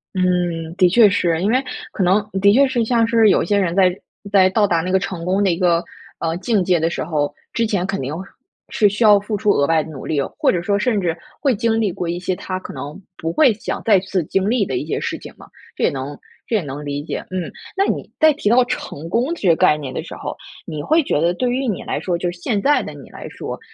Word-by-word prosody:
嗯， 175 Hz, -3 st, 0 dB
的 185 Hz, -2 st, +4 dB
确 215 Hz, +3 st, +6 dB
是。 175 Hz, -5 st, +1 dB
因 200 Hz, +4 st, +1 dB
为 255 Hz, +3 st, +2 dB, 0.3 s
可 195 Hz, -, -1 dB
能 195 Hz, +3 st, +2 dB
的 200 Hz, +1 st, +6 dB
确 275 Hz, +4 st, +5 dB
是 250 Hz, -3 st, 0 dB
像 230 Hz, 0 st, +2 dB
是 230 Hz, -2 st, +4 dB
有 -, -, +3 dB
一 -, -, -3 dB
些 205 Hz, -, +1 dB
人 180 Hz, -4 st, 0 dB
在 185 Hz, -2 st, +4 dB, 0.4 s
在 190 Hz, -2 st, +5 dB
到 205 Hz, +2 st, +2 dB
达 170 Hz, -3 st, +1 dB
那 180 Hz, +2 st, -3 dB
个 190 Hz, -, +3 dB
成 185 Hz, -3 st, -5 dB
功 190 Hz, +3 st, +1 dB
的 195 Hz, -, +3 dB
一 165 Hz, -, -1 dB
个， 175 Hz, -2 st, +2 dB, 0.4 s
呃， 165 Hz, 0 st, -1 dB
境 205 Hz, 0 st, +1 dB
界 180 Hz, -1 st, +2 dB
的 165 Hz, +1 st, +1 dB
时 -, -, -3 dB
候， 150 Hz, -3 st, -1 dB, 0.2 s
之 230 Hz, -, +1 dB
前 200 Hz, -4 st, 0 dB
肯 195 Hz, -3 st, -3 dB
定 130 Hz, +1 st, -4 dB, 0.6 s
是 210 Hz, -2 st, +3 dB
需 210 Hz, +4 st, -1 dB
要 210 Hz, -2 st, +7 dB
付 210 Hz, +1 st, -3 dB
出 210 Hz, 0 st, +2 dB
额 140 Hz, -5 st, +2 dB
外 160 Hz, -1 st, +2 dB
的 160 Hz, -, -10 dB
努 135 Hz, -4 st, -8 dB
力 150 Hz, -, -1 dB
哦， 140 Hz, -, -3 dB
或 -, -, +4 dB
者 175 Hz, -, -1 dB
说 200 Hz, +2 st, +1 dB
甚 220 Hz, -1 st, +1 dB
至 170 Hz, -4 st, -1 dB, 0.3 s
会 275 Hz, -5 st, +2 dB
经 225 Hz, +2 st, +1 dB
历 210 Hz, -4 st, +1 dB
过 175 Hz, -1 st, -4 dB
一 175 Hz, +1 st, -2 dB
些 180 Hz, +1 st, -2 dB
他 185 Hz, -1 st, -5 dB
可 -, -, -9 dB
能 145 Hz, +5 st, -7 dB, 0.2 s
不 165 Hz, -, -3 dB
会 260 Hz, -, +4 dB
想 210 Hz, -, -5 dB
再 205 Hz, -4 st, +5 dB
次 185 Hz, -1 st, -2 dB
经 195 Hz, +6 st, 0 dB
历 230 Hz, -3 st, +2 dB
的 130 Hz, -7 st, -2 dB
一 140 Hz, -, -3 dB
些 -, -, -1 dB
事 -, -, -3 dB
情 -, -, -10 dB
嘛， -, -, -14 dB, 0.3 s
这 -, -, -3 dB
也 -, -, +4 dB
能 140 Hz, +1 st, -5 dB, 0.3 s
这 230 Hz, -, 0 dB
也 205 Hz, -, +1 dB
能 145 Hz, 0 st, -6 dB
理 145 Hz, 0 st, -4 dB
解， -, -, -5 dB
嗯。 185 Hz, -3 st, -4 dB, 0.3 s
那 390 Hz, -, +3 dB
你 -, -, -3 dB
在 315 Hz, -1 st, +6 dB
提 275 Hz, -7 st, -1 dB
到 245 Hz, +2 st, +5 dB
成 165 Hz, -9 st, -5 dB
功 245 Hz, -, 0 dB
这 205 Hz, -, -2 dB
个 165 Hz, -, +6 dB
概 150 Hz, -, +4 dB
念 140 Hz, -3 st, -6 dB
的 -, -, -4 dB
时 -, -, -9 dB
候， -, -, -6 dB, 0.3 s
你 150 Hz, -1 st, -5 dB
会 315 Hz, -, +2 dB
觉 150 Hz, -, 0 dB
得 170 Hz, +1 st, +2 dB
对 250 Hz, +5 st, 0 dB
于 260 Hz, +2 st, -1 dB
你 210 Hz, -, -2 dB
来 -, -, -3 dB
说 175 Hz, -2 st, -1 dB
就 175 Hz, 0 st, -2 dB
是 175 Hz, -, -12 dB
现 205 Hz, +3 st, -1 dB
在 290 Hz, +4 st, +3 dB
的 -, -, -7 dB
你 -, -, -12 dB
来 -, -, -9 dB
说， -, -, -7 dB
185 Hz, 295 characters per minute, -20 LUFS, 170-220 Hz, 0.6 s, 要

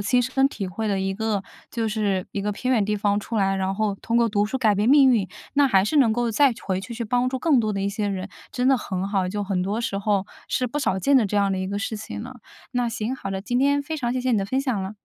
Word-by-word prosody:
亲 245 Hz, +5 st, +2 dB
身 270 Hz, +2 st, +2 dB
体 200 Hz, -8 st, -5 dB
会 215 Hz, +5 st, -4 dB
的 195 Hz, -2 st, 0 dB
一 195 Hz, 0 st, -1 dB
个 215 Hz, -2 st, -1 dB, 0.3 s
就 225 Hz, -1 st, -1 dB
是 205 Hz, -4 st, -1 dB
一 200 Hz, -, -2 dB
个 210 Hz, +1 st, -1 dB
偏 255 Hz, +5 st, -1 dB
远 220 Hz, -5 st, +3 dB
地 210 Hz, +1 st, 0 dB
方 205 Hz, 0 st, +1 dB
出 225 Hz, +2 st, -4 dB
来， 195 Hz, -1 st, +2 dB
然 190 Hz, 0 st, -1 dB
后 215 Hz, -1 st, 0 dB
通 230 Hz, +3 st, -2 dB
过 235 Hz, -1 st, +4 dB
读 205 Hz, -1 st, +1 dB
书 265 Hz, -, -3 dB
改 215 Hz, -5 st, +3 dB
变 210 Hz, +3 st, +1 dB
命 275 Hz, -1 st, +7 dB
运， 200 Hz, -5 st, +1 dB, 0.3 s
那 285 Hz, 0 st, +5 dB
还 195 Hz, -7 st, +4 dB
是 300 Hz, -, 0 dB
能 240 Hz, -6 st, +5 dB
够 240 Hz, 0 st, 0 dB
再 275 Hz, +2 st, +4 dB
回 190 Hz, -1 st, -1 dB
去， 235 Hz, +4 st, -8 dB
去 235 Hz, 0 st, -4 dB
帮 245 Hz, +3 st, +1 dB
助 260 Hz, -, -3 dB
更 290 Hz, -2 st, +3 dB
多 215 Hz, -2 st, -1 dB
的 195 Hz, -, -2 dB
一 200 Hz, -, 0 dB
些 205 Hz, +1 st, -2 dB
人， 190 Hz, 0 st, -4 dB, 0.2 s
真 250 Hz, +1 st, +1 dB
的 270 Hz, -, +5 dB
很 190 Hz, -2 st, -3 dB
好， 190 Hz, -3 st, 0 dB
就 205 Hz, +2 st, -3 dB
很 190 Hz, -2 st, -1 dB
多 205 Hz, +5 st, -1 dB
时 195 Hz, -4 st, -2 dB
候 200 Hz, -1 st, 0 dB, 0.2 s
是 255 Hz, -, 0 dB
不 270 Hz, +5 st, -3 dB
少 190 Hz, -9 st, 0 dB
见 275 Hz, +8 st, +3 dB
的 230 Hz, -5 st, +4 dB
这 205 Hz, -, -2 dB
样 200 Hz, -1 st, +3 dB
的 190 Hz, -, -1 dB
一 185 Hz, -, -2 dB
个 200 Hz, +1 st, -3 dB
事 220 Hz, 0 st, -3 dB
情 215 Hz, 0 st, -7 dB
了。 255 Hz, +2 st, -9 dB, 0.3 s
那 245 Hz, -1 st, 0 dB
行， 230 Hz, +2 st, -3 dB
好 195 Hz, -, -6 dB
了， 190 Hz, 0 st, -3 dB
今 245 Hz, +4 st, -1 dB
天 285 Hz, +1 st, +2 dB
非 315 Hz, +2 st, -4 dB
常 240 Hz, -4 st, -1 dB
谢 255 Hz, -, -1 dB
谢 255 Hz, 0 st, 0 dB
你 220 Hz, -, +3 dB
的 195 Hz, -, -2 dB
分 260 Hz, +5 st, 0 dB
享 255 Hz, -7 st, -1 dB
了。 190 Hz, +2 st, -6 dB
215 Hz, 325 characters per minute, -24 LUFS, 195-250 Hz, 0.3 s, 命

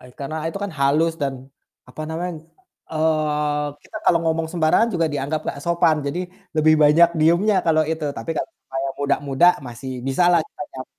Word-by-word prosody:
ah, 125 Hz, -, -14 dB
karena 140 Hz, +3 st, -5 dB
itu 180 Hz, -, -5 dB
kan 200 Hz, -, -4 dB
halus 150 Hz, +4 st, +2 dB
dan, 135 Hz, -1 st, -1 dB, 0.5 s
apa 155 Hz, -, -8 dB
namanya, 175 Hz, +3 st, -3 dB, 0.6 s
eee, 150 Hz, -2 st, 0 dB, 0.2 s
kita -, -, -11 dB
kalau 170 Hz, -, +4 dB
ngomong 165 Hz, 0 st, 0 dB
sembarangan 170 Hz, +7 st, +3 dB
juga 165 Hz, -2 st, +2 dB
dianggap 145 Hz, +2 st, -2 dB
nggak 140 Hz, -, -4 dB
sopan, 170 Hz, -2 st, +3 dB
jadi 140 Hz, +5 st, -2 dB, 0.4 s
lebih 155 Hz, 0 st, +5 dB
banyak 155 Hz, +3 st, +6 dB
diamnya 170 Hz, +7 st, +3 dB
kalau 155 Hz, -1 st, +4 dB
itu 160 Hz, -1 st, -3 dB
tapi 115 Hz, +7 st, -5 dB
kalau -, -, -2 dB
sama 135 Hz, -, -9 dB
yang 135 Hz, -, -4 dB
muda-muda 140 Hz, +2 st, +2 dB, 0.2 s
masih 125 Hz, +2 st, -7 dB, 0.2 s
bisalah 175 Hz, +5 st, +3 dB
kita -, -, -9 dB
nyam 130 Hz, 0 st, -7 dB
155 Hz, 175 wpm, -22 LUFS, 140-165 Hz, 0.6 s, banyak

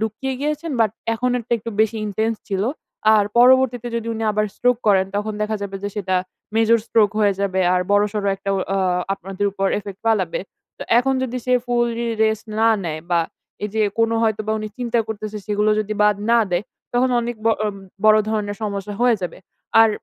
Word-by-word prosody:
লুকিয়ে 220 Hz, +5 st, -2 dB
গিয়েছেন। 300 Hz, +2 st, -2 dB
বাট 220 Hz, -2 st, +4 dB, 0.2 s
এখন 250 Hz, +2 st, 0 dB
এরটা 235 Hz, 0 st, -5 dB
একটু 230 Hz, +2 st, -6 dB
বেশি 220 Hz, +1 st, +2 dB
ইনটেনস 220 Hz, +2 st, -1 dB
ছিল। 195 Hz, -1 st, -1 dB, 0.5 s
আর 205 Hz, -1 st, +4 dB
পরবর্তীতে 250 Hz, -1 st, +5 dB
যদি 230 Hz, 0 st, -4 dB
উনি 225 Hz, -, -4 dB
আবার 215 Hz, 0 st, +1 dB
স্ট্রোক 245 Hz, -1 st, +2 dB
করেন, 190 Hz, -2 st, +4 dB
তখন 210 Hz, +1 st, -2 dB
দেখা 215 Hz, 0 st, -1 dB
যাবে 195 Hz, -1 st, -4 dB
যে 205 Hz, -, -2 dB
সেটা 185 Hz, -2 st, 0 dB, 0.4 s
মেজর 225 Hz, +1 st, +4 dB
স্ট্রোক 210 Hz, -3 st, +3 dB
হয়ে 200 Hz, -2 st, +3 dB
যাবে। 190 Hz, -1 st, 0 dB
আর 180 Hz, -, +2 dB
বড়সড় 205 Hz, 0 st, +1 dB
একটা 195 Hz, 0 st, -4 dB
অ -, -, 0 dB
অ্যা 195 Hz, -, +1 dB, 0.4 s
আপনাদের 195 Hz, +2 st, -3 dB
উপর 195 Hz, -1 st, -1 dB
ইফেক্ট 200 Hz, -1 st, -9 dB
ফালাবে। 225 Hz, -, +1 dB, 0.4 s
তো -, -, -5 dB, 0.2 s
এখন 265 Hz, +2 st, +2 dB
যদি 255 Hz, -1 st, -3 dB
সে 250 Hz, -, +2 dB
ফুললি 235 Hz, -1 st, 0 dB, 0.2 s
রেস্ট 220 Hz, 0 st, -1 dB
না 225 Hz, -, +5 dB, 0.2 s
নেয়, 155 Hz, -1 st, -3 dB
বা 170 Hz, -1 st, +4 dB, 0.4 s
এই -, -, -1 dB
যে 220 Hz, -, +2 dB, 0.2 s
কোন 225 Hz, 0 st, +3 dB
হয়তোবা 215 Hz, -1 st, 0 dB
উনি 215 Hz, 0 st, -4 dB
চিন্তা 240 Hz, -1 st, 0 dB
করতেছে, 215 Hz, 0 st, -5 dB
সেগুলো 210 Hz, 0 st, +1 dB
যদি 215 Hz, 0 st, -3 dB
বাদ 210 Hz, -1 st, +4 dB
না 235 Hz, -, +6 dB
দেয়, 175 Hz, +3 st, 0 dB, 0.3 s
তখন 250 Hz, +1 st, +2 dB
অনেক 235 Hz, 0 st, -4 dB
ব -, -, 0 dB, 0.2 s
অ -, -, +2 dB, 0.4 s
বড় 215 Hz, 0 st, +7 dB
ধরনের 205 Hz, -2 st, -2 dB
সমস্যা 200 Hz, -1 st, -3 dB
হয়ে 245 Hz, -3 st, +4 dB
যাবে।" 180 Hz, -, -4 dB, 0.4 s
আর 225 Hz, -, +7 dB
215 Hz, 195 wpm, -21 LUFS, 205-235 Hz, 0.5 s, বড়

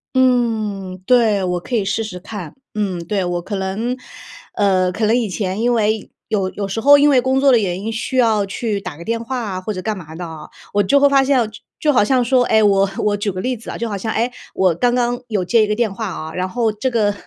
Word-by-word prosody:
嗯， 220 Hz, -7 st, +1 dB
对， 225 Hz, -5 st, +3 dB
我 180 Hz, -1 st, -1 dB
可 240 Hz, +8 st, -4 dB
以 210 Hz, -4 st, +1 dB
试 200 Hz, +3 st, -1 dB
试 185 Hz, -4 st, -7 dB
看。 185 Hz, -3 st, -8 dB, 0.2 s
嗯， 200 Hz, -4 st, -2 dB
对， 200 Hz, -1 st, 0 dB
我 175 Hz, 0 st, -2 dB
可 200 Hz, +4 st, -5 dB
能 205 Hz, +6 st, -2 dB, 0.6 s
呃， 185 Hz, -3 st, +2 dB
可 215 Hz, +4 st, -1 dB
能 220 Hz, +2 st, +3 dB
以 235 Hz, -4 st, 0 dB
前 190 Hz, +1 st, -3 dB
因 240 Hz, +1 st, +2 dB
为 215 Hz, -2 st, 0 dB, 0.2 s
有 200 Hz, -4 st, 0 dB
有 200 Hz, -1 st, -4 dB
时 195 Hz, +3 st, -3 dB
候 285 Hz, +4 st, +8 dB
因 290 Hz, +1 st, +5 dB
为 265 Hz, -3 st, +4 dB
工 260 Hz, +1 st, +1 dB
作 275 Hz, 0 st, +5 dB
的 240 Hz, -, +5 dB
原 185 Hz, -3 st, -2 dB
因 220 Hz, +2 st, -3 dB
需 255 Hz, +4 st, -3 dB
要 220 Hz, -5 st, +3 dB
去 205 Hz, +1 st, -3 dB
打 155 Hz, -, -7 dB
个 170 Hz, -, -9 dB
电 230 Hz, +4 st, -2 dB
话 255 Hz, +2 st, -3 dB
啊 190 Hz, -5 st, -4 dB
或 215 Hz, +3 st, -3 dB
者 185 Hz, -, -5 dB
干 210 Hz, +2 st, -2 dB
嘛 160 Hz, -3 st, -10 dB
的， 175 Hz, +1 st, -5 dB, 0.5 s
我 205 Hz, -, +3 dB
就 280 Hz, +9 st, +3 dB
会 285 Hz, -, +6 dB
发 275 Hz, -1 st, +4 dB
现， 275 Hz, 0 st, +2 dB
就 215 Hz, -, -12 dB, 0.2 s
就 300 Hz, -1 st, +2 dB
好 245 Hz, -, +4 dB
像 255 Hz, +3 st, +2 dB
说 250 Hz, +1 st, +3 dB
唉， 220 Hz, -2 st, +3 dB
我 195 Hz, -1 st, +3 dB
我 210 Hz, -1 st, +2 dB
举 205 Hz, 0 st, -1 dB
个 185 Hz, 0 st, -5 dB
例 255 Hz, +3 st, -1 dB
子 225 Hz, -, -10 dB
啊， -, -, -6 dB
就 235 Hz, -, -2 dB
好 205 Hz, -, -3 dB
像 220 Hz, +3 st, -3 dB
哎， 235 Hz, +3 st, 0 dB, 0.2 s
我 185 Hz, -2 st, +3 dB
刚 245 Hz, +7 st, +1 dB
刚 245 Hz, 0 st, 0 dB
有 210 Hz, -5 st, -1 dB
接 220 Hz, +5 st, +4 dB
一 -, -, 0 dB
个 210 Hz, -, 0 dB
电 230 Hz, -2 st, 0 dB
话 220 Hz, +2 st, -4 dB
啊。 160 Hz, -3 st, -6 dB
然 185 Hz, 0 st, -2 dB
后 230 Hz, +3 st, 0 dB
这 215 Hz, +5 st, -2 dB
个， 210 Hz, -3 st, +2 dB
215 Hz, 280 characters per minute, -19 LUFS, 195-240 Hz, 0.6 s, 候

